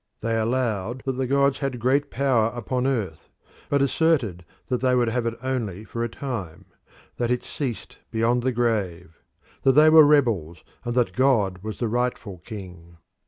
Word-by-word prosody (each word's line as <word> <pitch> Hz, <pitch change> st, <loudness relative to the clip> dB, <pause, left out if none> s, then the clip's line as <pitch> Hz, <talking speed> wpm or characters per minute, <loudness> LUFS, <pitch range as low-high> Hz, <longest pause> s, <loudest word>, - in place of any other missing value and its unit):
They 115 Hz, +1 st, -1 dB
allowed 115 Hz, 0 st, -1 dB
that 135 Hz, -, 0 dB
the 130 Hz, 0 st, -2 dB
gods 140 Hz, +1 st, +2 dB
had 135 Hz, -4 st, -3 dB
great 140 Hz, +4 st, +1 dB
power 130 Hz, -5 st, +2 dB
upon 125 Hz, +2 st, -1 dB
earth, 105 Hz, -12 st, -3 dB, 0.4 s
but 140 Hz, -1 st, +2 dB
asserted 135 Hz, -, +1 dB, 0.2 s
that 125 Hz, -2 st, -1 dB
they 130 Hz, -1 st, +3 dB
would 120 Hz, -2 st, +2 dB
have 120 Hz, 0 st, -1 dB
it 115 Hz, -, -2 dB
only 115 Hz, -7 st, -3 dB
for 115 Hz, +1 st, -4 dB
a 120 Hz, -, -2 dB
time; 100 Hz, -, -6 dB, 0.5 s
that 120 Hz, -1 st, -1 dB
it 125 Hz, 0 st, 0 dB
ceased 125 Hz, -, -5 dB
beyond 115 Hz, +2 st, +1 dB
the 130 Hz, +2 st, 0 dB
grave; 100 Hz, -9 st, -2 dB, 0.4 s
that 135 Hz, -, +4 dB
they 155 Hz, +3 st, +6 dB
were 160 Hz, 0 st, +9 dB
rebels, 115 Hz, -, +2 dB, 0.2 s
and 120 Hz, -1 st, -3 dB
that 125 Hz, -2 st, +1 dB
God 110 Hz, -8 st, +2 dB
was 110 Hz, +1 st, -6 dB
the 120 Hz, -, -1 dB
rightful 115 Hz, -5 st, -2 dB
king. 90 Hz, -4 st, -10 dB
120 Hz, 170 wpm, -24 LUFS, 105-130 Hz, 0.5 s, were